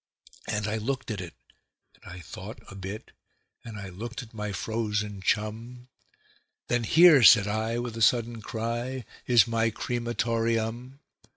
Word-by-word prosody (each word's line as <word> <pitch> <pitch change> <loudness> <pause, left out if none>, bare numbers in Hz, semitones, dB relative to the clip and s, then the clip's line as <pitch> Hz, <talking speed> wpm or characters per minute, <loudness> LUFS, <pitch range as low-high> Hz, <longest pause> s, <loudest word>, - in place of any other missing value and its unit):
And 105 -1 -1
I 105 +1 -1
looked 125 +2 -3
at 100 -3 -4
it, 90 -2 -9 0.6
and - - -14
I 90 0 -9
thought 100 +5 -9
a - - -9
bit, 100 +2 -7 0.5
and 115 -2 -8
I 100 -2 -7
looked 120 +7 -7
at 115 - -16
my 105 -1 -4
frozen 105 -1 -2
chum; 115 +5 -2 0.8
Then 120 -1 +1
"Here", 160 0 +7
said 110 -3 +8
I, 110 +2 -1
with 120 -1 -4
a 115 - -5
sudden 115 0 +2
cry, 120 +3 -4 0.2
"is 120 -4 +6
my 115 0 +1
cre 120 +2 -3
ma 120 0 -4
tor 115 -1 0
eum." 115 +4 -2
115 Hz, 165 wpm, -27 LUFS, 105-120 Hz, 0.8 s, said